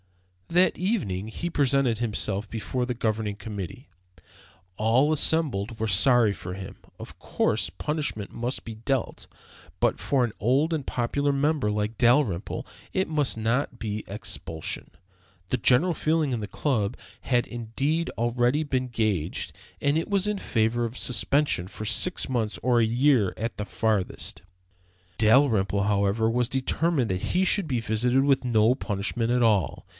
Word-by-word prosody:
That 180 +2 +3
evening 110 - -1
he 170 +10 -4
presented 135 -6 +2
himself 105 -3 -2
before 125 +3 -2
the 125 0 -3
Governing 110 -3 -1
Committee. 105 - -7 0.9
All 120 +9 +3
assembled 130 -9 +1
were 110 - 0
sorry 110 +2 +4
for 90 -2 -7
him. 95 -1 -8 0.2
Of - - -10
course, - - 0
punishment 150 -9 -3
must 120 +3 -3
be 115 - -7
dealt, 125 +3 -2 0.5
but - - +2
for 130 -3 +1
an 115 - -6
old 135 - +2
and 150 -4 -2
popular 140 +4 0
member 140 -5 +1
like 105 +1 -2
Dalrymple 120 - +2 0.3
it 190 - 0
must 150 -6 0
not 120 +3 -1
be 105 -1 -4
expulsion. 100 -6 -4 0.6
The 125 - +1
general 130 +9 +3
feeling 155 -3 0
of 115 - -2
the 105 - -4
Club 115 -9 -1 0.2
had 120 -2 +1
indeed 135 +8 -2
already 120 +5 +1
been 130 -3 -1
gauged, 110 -9 -2 0.3
and 145 +1 +1
it 165 - -5
was 200 -1 +1
in 210 -1 -1
favor 115 -2 0
of 120 +2 -4
suspension 120 -3 +1
for 110 - -8
six 140 +11 +1
months 115 -5 -1
or 120 -1 +3
a - - +4
year 120 -3 +3
at 115 +2 -3
the 105 - -4
farthest. 105 -3 -2 0.8
Dalrymple, 110 -5 +3
however, 100 +2 +1
was 120 +1 0
determined 135 0 0
that 90 0 -2
he 185 +1 +2
should 195 -2 +2
be 125 -5 0
visited 120 +4 +1
with 135 -2 +3
no 115 -1 +3
punishment 115 +1 -2
at 125 0 +2
all. 105 -9 +1
120 Hz, 150 wpm, -26 LUFS, 105-140 Hz, 0.9 s, sorry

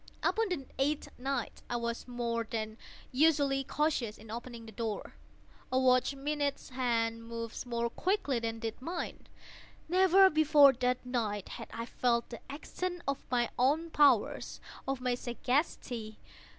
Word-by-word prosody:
Upon 450 -2 +2
the 315 -7 -2
eighth 285 +2 0
night 265 -2 -3
I 240 - -1
was 235 0 -3
more 235 -2 -2
than 220 -1 -3 0.3
usually 280 -1 +3
cautious 270 -7 0
in 220 0 -12
opening 235 0 -7
the 220 - -10
door. 220 0 -4 0.6
A 255 - +2
watch's 260 +1 +3
minute 285 0 -1
hand 230 -3 0
moves 230 +1 -6
more 235 -1 0
quickly 285 - 0
than 225 0 -3
did 225 +1 -5
mine. 340 +5 -5 0.6
Never 380 +2 +6
before 300 -3 +7
that 250 0 0
night 220 -5 -2
had 230 - -7
I 230 - -4
felt 235 -1 0
the 235 - -6
extent 355 +5 -4
of 275 0 -1
my 240 -2 +1
own 305 +6 +2
powers—of 275 -2 +1
my 250 -1 +1
sagacity. 245 -3 -2
250 Hz, 140 wpm, -32 LUFS, 230-285 Hz, 0.6 s, before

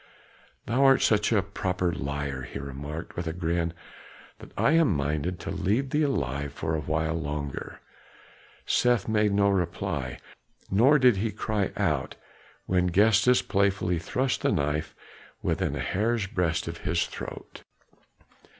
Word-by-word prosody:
"Thou 125 +4 +2
art 135 -1 +5
such 105 0 +3
a 105 -4 +3
proper 90 -3 -2
liar," 70 -1 -3
he 65 - -7
remarked 70 +4 -7
with 85 -1 -4
a 80 - -2
grin, 85 -1 -1 0.7
"that - - -12
I - - +3
am 160 - +4
minded 75 +5 -2
to - - -5
leave 105 +8 0
thee 150 - +2
alive 70 - -1
for 80 +2 -3
a 80 - 0
while 80 +1 -1
longer." 75 -3 -5 0.8
Seth 120 -4 +2
made 105 -2 +2
no 100 0 +3
reply, 85 -7 -2 0.5
nor 125 +10 +5
did 125 -6 +5
he 110 +4 0
cry 105 -1 -1
out - - 0 0.5
when 90 -1 +2
Gestas 110 +6 +4
playfully 95 -3 +1
thrust 130 +10 -1
the - - +2
knife 75 +2 -1 0.5
within - - 0
a - - -4
hair's 110 +2 0
breadth 90 -4 -1
of 85 0 -5
his 85 +1 0
throat. - - -8
90 Hz, 145 wpm, -27 LUFS, 80-105 Hz, 0.8 s, art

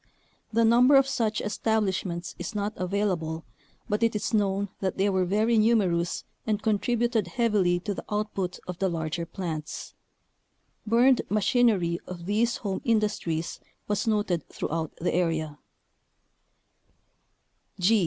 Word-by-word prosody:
The 230 +1 +3
number 245 +5 +6
of 270 0 +6
such 220 -5 0
establishments 195 -5 -1
is 175 +4 -5
not 205 +1 -1
avail 200 +3 0
able, 160 -2 -4 0.4
but 210 -1 -1
it 230 -1 +2
is 210 - -2
known 200 -1 +1
that 190 -2 -2
they 200 +1 +2
were 185 -1 +2
very 215 +5 +2
numerous 190 -7 +2 0.2
and 210 -2 +1
contributed 225 0 +1
heavily 195 -4 +2
to 205 - -2
the - - -6
output 205 -3 -2
of 180 -1 -6
the 190 0 +1
larger 165 0 -3
plants. 160 -5 -5 0.9
Burned 245 +4 +5
machinery 205 -5 +2
of 175 -2 -7
these 225 +5 +1
home 195 -3 -3
industries 210 -8 0 0.3
was 205 +2 -1
noted 205 -6 0
throughout 160 -1 -3
the 175 - 0
area. 160 -4 -1
200 Hz, 130 wpm, -27 LUFS, 175-220 Hz, 0.9 s, number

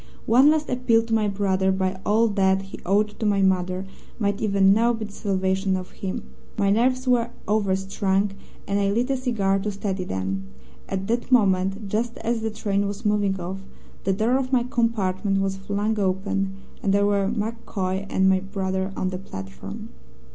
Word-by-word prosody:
One 255 +6 +6
last 310 0 +2
appeal 245 -3 +2
to 225 0 -4
my 215 -1 +3
brother 195 -1 +1
by 190 0 -1
all 220 +3 +3
that 195 -1 +2
he 195 - -10
owed 210 +2 +1
to 220 - -1
my 200 -1 +3
mother 185 0 +1 0.3
might 205 -3 -1
even 195 -2 +4
now 235 +3 +3
be 220 -1 -4
the 210 - -10
salvation 190 -1 0
of 185 0 -7
him. 190 -1 -5 0.3
My 200 -1 +3
nerves 255 +4 +2
were 240 -2 +3 0.2
overstrung, 195 -1 +1 0.4
and 200 0 +1
I 200 -1 +2
lit 235 +6 +1
a - - +2
cigar 210 -7 +1
to 210 +2 -2
steady 195 -1 -3
them. 95 - -3 0.4
At 190 0 -2
that 235 +4 -2
moment, 195 -3 +2
just 225 +4 -1
as 230 0 -1
the 220 - -1
train 205 -2 -1
was 205 +2 -6
moving 205 -2 +1
off, 185 +2 -4 0.4
the 195 - +1
door 225 +6 +2
of 265 -1 -2
my 250 -2 +3
compartment 205 -5 0
was 195 0 -1
flung 205 +2 -1
open, 195 0 0 0.3
and 195 0 +2
there 200 0 +3
were 200 -1 +2
MacCoy 205 -4 -3
and 190 0 +2
my 190 0 +4
brother 190 0 -2
on 185 - 0
the 185 - -4
platform. 95 - -8
200 Hz, 185 wpm, -24 LUFS, 190-220 Hz, 0.4 s, One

